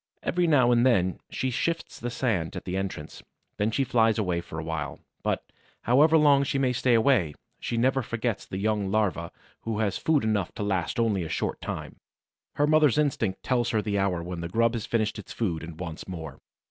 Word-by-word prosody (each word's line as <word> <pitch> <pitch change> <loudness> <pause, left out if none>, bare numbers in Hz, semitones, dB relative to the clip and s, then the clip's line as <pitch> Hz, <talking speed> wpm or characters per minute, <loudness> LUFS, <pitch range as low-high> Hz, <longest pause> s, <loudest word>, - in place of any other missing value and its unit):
Every 175 0 +1
now 130 -6 +5
and 120 0 +4
then 95 -8 +2
she 130 - -2
sifts 165 +6 -2
the 120 - -3
sand 110 -10 -1
at - - -6
the 90 - -3
entrance; 95 -6 -4 0.4
then 105 +1 +1
she 135 +5 +1
flies 115 -3 +3
away 90 -5 0
for 80 - -9
a 80 - -3
while. 80 -3 -4 0.2
But, - - -1 0.4
however 150 +7 +5
long 145 -2 +5
she 140 - -1
may 130 -2 +2
stay 125 -1 +3
away, 110 - +3 0.2
she 115 - -3
never 130 +3 +2
forgets 115 -1 -3
the 95 - -5
young 105 -1 0
larva 95 -5 0 0.3
who 115 -2 -3
has 105 -3 0
food 155 -5 +2
enough 105 -5 0
to - - -3
last 100 +3 -1
only 110 -5 +2
a 80 - -4
short - - -2
time; - - -5 0.6
her 145 - +3
mother's 150 -3 +4
instinct 120 -10 0
tells 120 -2 +1
her 110 - +1
the 100 -2 0
hour 90 -3 0
when 90 -1 -5
the 85 - -4
grub 115 +4 +2
has 115 -3 -3
finished 110 -2 0
its 100 - -9
food 90 -9 -1
and 80 0 -9
wants 85 -3 -6
more. 80 -7 -7
110 Hz, 210 wpm, -27 LUFS, 90-125 Hz, 0.6 s, now